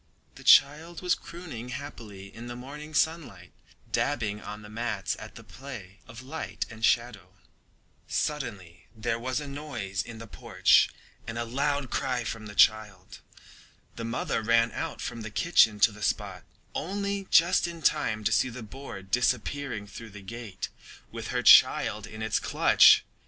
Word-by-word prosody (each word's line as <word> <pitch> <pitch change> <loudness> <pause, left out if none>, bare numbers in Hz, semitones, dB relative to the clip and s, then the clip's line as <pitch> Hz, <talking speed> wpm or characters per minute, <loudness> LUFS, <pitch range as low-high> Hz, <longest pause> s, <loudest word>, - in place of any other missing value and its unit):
The - - -14
child 160 +5 +5
was 180 -1 +3
crooning 155 -12 -8
happily 115 -7 -8
in 115 +1 -8
the 120 - -6
morning 150 +5 -9
sunlight, 135 - -1 0.4
dabbing 110 -7 -1
on 105 0 -8
the - - -10
mats 110 -3 -2
at - - -10
the - - -11
play 110 -8 -10
of 115 +2 -11
light 155 +5 -5
and 110 0 -11
shadow. 110 -7 +1 0.7
Suddenly 100 - -4
there 115 +1 -2
was 130 +4 -2
a 145 - -7
noise 120 -9 -4
in 115 0 -9
the 115 - -9
porch 105 - +3 0.4
and 115 - -5
a 120 - -2
loud 140 +2 -1
cry 130 -3 -1
from 110 -1 -5
the 105 - -10
child. 105 -4 +2 0.8
The 115 - -6
mother 115 0 -2
ran 115 +1 +3
out - - -5
from 115 - -5
the 110 - -6
kitchen 110 -4 +3
to 110 - +6
the 105 +1 -13
spot, - - -2 0.3
only 200 +3 -3
just 175 +1 +4
in 170 -2 -8
time 110 -5 +1
to 105 - +1
see 120 +4 +2
the 120 0 -8
boar 110 -3 -9
disappearing 125 +2 -1
through 110 +3 -10
the 105 -1 -12
gate 110 -2 -7 0.4
with - - -6
her - - -2
child 105 +1 +6
in 110 +1 -7
its 110 -1 +1
clutch. - - +6
115 Hz, 160 wpm, -28 LUFS, 105-140 Hz, 0.8 s, to